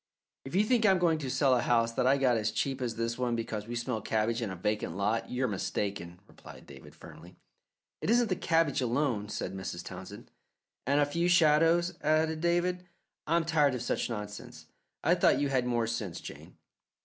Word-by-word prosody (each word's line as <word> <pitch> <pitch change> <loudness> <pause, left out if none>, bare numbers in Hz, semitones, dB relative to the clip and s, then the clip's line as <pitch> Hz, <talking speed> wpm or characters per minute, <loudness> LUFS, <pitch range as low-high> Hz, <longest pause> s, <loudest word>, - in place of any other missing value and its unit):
"If 135 - -6
you 200 - +4
think 230 +1 +2
I'm 195 -3 +5
going 170 -3 +2
to 135 -4 -4
sell 135 0 +3
a 120 - +1
house 115 -1 +2
that 125 - 0
I 135 +2 +4
got 130 -3 +2
as 110 -1 0
cheap 135 +4 -2
as 120 -3 -2
this 115 +1 -3
one 125 -2 0
because 110 -2 -4
we 120 - -5
smell 120 -2 -3
cabbage 110 +3 -1
in 115 - -2
a 95 - -5
vacant 105 -2 -2
lot, 110 +3 -1
you're 125 +1 -1
mistaken," 95 -4 -4
replied - - -14
David 65 -1 -14
firmly. 85 +3 -14 0.7
"It - - -2
isn't 235 0 +3
the 185 - +1
cabbage 165 -6 +1
alone," 120 -4 -1
said - - -4
Mrs. 95 -2 -6
Townsend. 95 +2 -10 0.6
"And 140 +2 +3
a 145 - +4
few 170 +4 -1
shadows," 170 +1 +3
added 155 +1 +1
David. 175 +1 0 0.4
"I 165 - +2
am 170 -1 +2
tired 150 -5 +2
of 125 - -4
such - - -1
nonsense. 105 -3 -7 0.4
I - - +4
thought - - +3
you 145 -1 0
had 130 -2 0
more 120 -2 +1
sense, 110 -6 -4
Jane." - - -11
125 Hz, 200 wpm, -30 LUFS, 110-160 Hz, 0.7 s, I'm